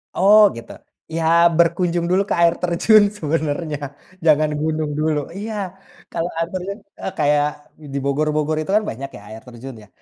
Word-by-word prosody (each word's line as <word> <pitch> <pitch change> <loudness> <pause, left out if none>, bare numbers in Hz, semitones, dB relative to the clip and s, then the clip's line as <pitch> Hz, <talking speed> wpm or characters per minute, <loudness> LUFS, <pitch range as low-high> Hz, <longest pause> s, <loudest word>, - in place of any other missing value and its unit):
Oh, 205 +3 +6
gitu, 115 0 -10 0.4
ya, 165 - -1 0.3
berkunjung 170 0 +2
dulu 185 +3 +2
ke - - +1
air 170 -1 +5
terjun 195 +5 +4
sebenarnya, 155 -2 -2 0.5
jangan 155 -1 +4
gunung 155 -1 -1
dulu. 155 -1 +1 0.2
Iya, 215 +2 -5 0.6
kalau 165 +1 -2
air 165 0 0
terjun 190 +2 -4 0.2
eee, - - -3
kayak 145 0 +3 0.5
di - - -2
Bogor-bogor 150 +2 0
itu, 155 - -7
kan, 215 - +3
banyak, 135 +4 -6
ya, - - -13
air 110 +1 -9
terjun, 125 +2 -9
ya, - - -18
155 Hz, 160 wpm, -20 LUFS, 150-175 Hz, 0.6 s, Oh